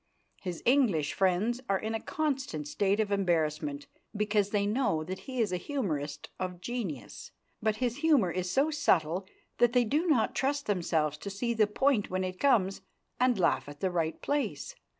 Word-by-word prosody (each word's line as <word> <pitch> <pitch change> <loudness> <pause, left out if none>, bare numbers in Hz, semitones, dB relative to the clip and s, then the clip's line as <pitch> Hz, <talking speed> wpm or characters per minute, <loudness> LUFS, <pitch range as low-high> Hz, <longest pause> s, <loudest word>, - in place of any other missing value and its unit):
His 180 -3 -5
English 230 - +3
friends 195 +6 +1
are 195 - +3
in 220 +3 -3
a 225 - -1
constant 265 - -2
state 200 +6 +1
of 210 -2 0
embarrassment 155 -6 0 0.3
because 210 -1 +1
they 205 -1 +1
know 205 -7 +1
that 185 +4 -5
he 255 -1 -3
is 215 -5 +2
a 180 - 0
humorist 155 - -3
of 180 -1 -4
genius, 190 - -5 0.3
but 215 0 +1
his 245 +1 -1
humour 290 - +3
is 180 0 -2
so 280 - +2
subtle 185 - +1 0.3
that 240 0 +4
they 245 -1 +4
do 300 +10 +1
not 255 -9 +3
trust 280 +1 0
themselves 160 -6 0
to 200 - -6
see 235 +5 -1
the 220 -2 +3
point 230 +1 +1
when 185 0 -1
it 185 0 -4
comes 210 -9 +2 0.4
and 250 -2 +3
laugh 175 -5 +1
at 145 0 -11
the 190 +2 0
right 165 -2 -1
place. 290 - -2
200 Hz, 180 wpm, -30 LUFS, 175-245 Hz, 0.4 s, that